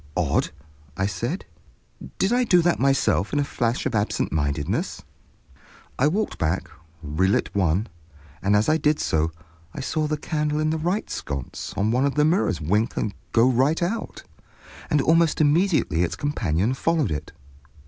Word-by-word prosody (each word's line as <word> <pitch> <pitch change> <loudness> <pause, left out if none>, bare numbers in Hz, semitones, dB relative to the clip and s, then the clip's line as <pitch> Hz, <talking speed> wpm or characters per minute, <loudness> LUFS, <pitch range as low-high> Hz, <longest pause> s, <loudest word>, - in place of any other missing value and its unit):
"Odd," - - +1 0.5
I 95 - +1
said. 95 -4 -3 0.7
"Did 195 +5 +1
I 250 +1 +3
do 180 -7 +4
that 175 0 +2
myself 135 -6 +2
in 145 - +2
a - - +2
flash 120 -4 -1
of - - -1
absent 105 -1 0
mindedness?" 70 -2 -2 1.0
I 135 - +4
walked 205 +8 -1
back, 80 +4 -1 0.3
relit 85 +6 0
one, 95 +1 +1 0.6
and 100 +1 +2
as 105 +1 +2
I 155 - +4
did 150 -1 +1
so 80 +1 0 0.4
I - - -5
saw 155 +3 -1
the 155 0 -1
candle 150 -1 -1
in 155 0 +1
the 160 - -1
right 180 +7 -1
sconce 70 -3 -5
of 100 - +1
one 130 +3 +2
of 140 - -2
the 150 0 +3
mirrors 155 - +1
wink 105 +9 0
and 105 - -1 0.2
go 115 +2 +4
right 135 +7 +2
out, 215 +6 -3 0.7
and 145 -2 +2
almost 165 +1 +3
immediately 155 - +2
its 90 - 0
companion 110 - 0
followed 155 - 0
it. 75 - -4
135 Hz, 165 wpm, -24 LUFS, 95-155 Hz, 1.0 s, do